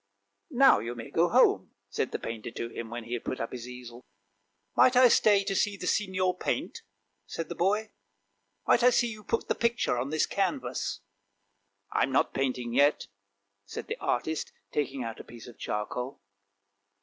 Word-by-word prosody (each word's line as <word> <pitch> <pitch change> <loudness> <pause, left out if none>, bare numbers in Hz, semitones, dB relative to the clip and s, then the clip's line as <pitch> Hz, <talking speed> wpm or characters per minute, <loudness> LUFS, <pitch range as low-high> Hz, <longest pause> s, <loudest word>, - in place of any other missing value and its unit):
" - - -51
Now 270 - +6
you 115 +3 -5
may 115 -1 -8
go - - +3
home," - - +3
said - - -2
the - - -2
painter 115 -1 -6
to 115 0 -5
him, 115 -1 -6
when 120 0 -5
he 115 +2 -6
had 120 - -3
put 130 - -4
up 115 - -3
his 125 -1 -7
easel. 125 -1 -10 0.7
"Might 255 - +5
I 250 0 +8
stay 205 -3 +5
to 195 0 -2
see 205 +1 +1
the 180 - -6
Signor 185 -2 +1
paint?" - - -2 0.5
said 165 - -5
the - - -3
boy; 210 +5 0 0.4
" 100 0 -41
might - - +5
I 250 - +7
see 240 -1 +2
you 215 -1 -10
put 230 - -2
the - - +2
picture 235 - 0
on 130 +3 -2
this 155 0 +1
canvas? - - -2 0.3
" 100 0 -48
" 100 0 -45
I'm 135 - +1
not 130 - +2
painting 125 -3 -1
yet," 145 +3 +3 0.6
said - - -6
the - - -5
artist, 155 +6 -1 0.2
taking 140 -3 -2
out 115 -1 -6
a - - -8
piece 115 -1 -12
of 120 - -13
charcoal. 125 +5 -4
125 Hz, 195 wpm, -29 LUFS, -, 0.7 s, I